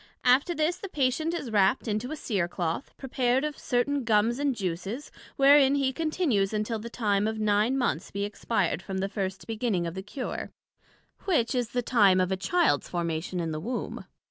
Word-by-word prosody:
After 270 +8 +4
this 315 +3 +1
the 395 - -7
Patient 295 +2 0
is 290 -9 -4
wrapt 205 +4 +2
into 215 +3 -2
a - - -2
Cere 200 - -1
cloth, 175 - -3
prepared 255 0 0
of 300 -1 -2
certain 270 +3 0
Gums 230 +2 +2
and 285 -2 +1
Juices, 195 - -4 0.2
wherein 280 0 +6
he 270 -2 +1
continues 300 - 0
until 215 +1 -1
the 230 +2 -7
time 210 -3 0
of 220 0 -2
nine 215 +4 +2
Months 235 - -1
be 200 0 -3
expired 205 -3 -1
from 190 0 -5
the 190 +1 0
first 190 -2 -4
beginning 220 -6 -1
of 165 - -4
the 190 - -5
cure, 250 +6 -5 0.8
which 295 - +1
is 245 -3 -1
the 245 0 -1
time 205 -7 +4
of 185 0 +1
a - - +2
Childs 345 - +1
formation 170 +1 -2
in 165 -2 -2
the 155 - -3
Womb. 235 +9 -4
230 Hz, 190 wpm, -27 LUFS, 195-270 Hz, 0.8 s, wherein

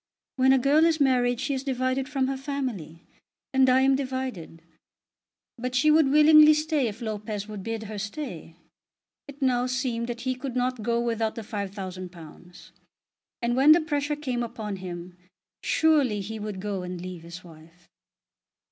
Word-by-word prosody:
"When 260 0 +4
a 265 - +5
girl 280 +5 +4
is 325 -1 +2
married 245 -3 +2
she 275 +2 -1
is 265 -1 -3
divided 260 0 -1
from 270 -2 0
her 270 +1 -2
family; 255 - -5 0.5
and 265 -1 +4
I 255 +1 +5
am 270 0 +4
divided." 260 - -5 1.0
But 250 +1 -3
she 305 +5 +4
would 310 -2 +5
willingly 305 +1 +7
stay 305 -4 0
if 220 +2 -7
Lopez 210 -1 -4
would 210 -2 -7
bid 225 +2 -4
her 215 -1 -6
stay. 205 - -6 0.7
It 285 0 -7
now 250 -1 +2
seemed 250 -2 -2
that 240 0 -5
he 260 0 -1
could 255 0 -6
not 250 -1 -1
go 235 +2 0
without 230 -2 -1
the 225 - -6
£5000; 185 -4 -8 0.7
and, 240 0 +1
when 280 +4 +7
the 335 - +3
pressure 295 -1 -1
came 260 -5 -3
upon 220 -4 -5
him, 180 -1 -8 0.5
surely 290 -9 +2
he 220 +3 -6
would 210 -2 -5
go 200 -1 -3
and 180 0 -6
leave 180 -1 -7
his 170 +2 -10
wife. 165 +1 -17
245 Hz, 165 wpm, -26 LUFS, 200-270 Hz, 1.0 s, willingly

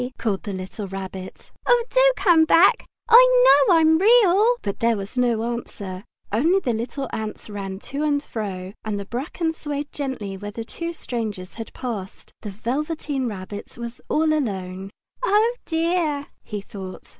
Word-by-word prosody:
called 205 -4 -1
the 210 - -5
little 190 +2 -5
Rabbit. 190 -1 -8 0.2
"Oh, 485 -1 +4
do - - +5
come 340 -5 +5
back! 380 +8 +5 0.2
I - - +7
know 350 - +7
I 325 - +5
am 320 0 +5
Real!" 435 +1 +5
But 200 - -3
there 230 -1 +2
was 200 +4 -7
no 240 -2 +1
answer, 200 -4 -7 0.3
only 320 - +3
the 250 -10 -1
little 240 +5 -3
ants 215 0 -5
ran 195 -2 -5
to 280 +8 -5
and 290 -1 +1
fro, 195 -6 -5
and 210 -2 -2
the 200 - -6
bracken 310 - -3
swayed 295 -2 -5
gently 255 -9 -4
where 205 +2 -6
the 225 +2 -6
two 335 +7 -5
strangers 215 - -5
had 225 -1 -7
passed. 215 -7 -6
The 210 - -6
Velveteen 270 - -2
Rabbit 205 0 -7
was 235 0 -7
all 310 0 +2
alone. 195 -9 -3 0.3
"Oh, 455 +1 +3
dear!" 325 -3 0
he 210 -1 -6
thought. 190 -2 -9
240 Hz, 165 wpm, -23 LUFS, 205-320 Hz, 0.3 s, I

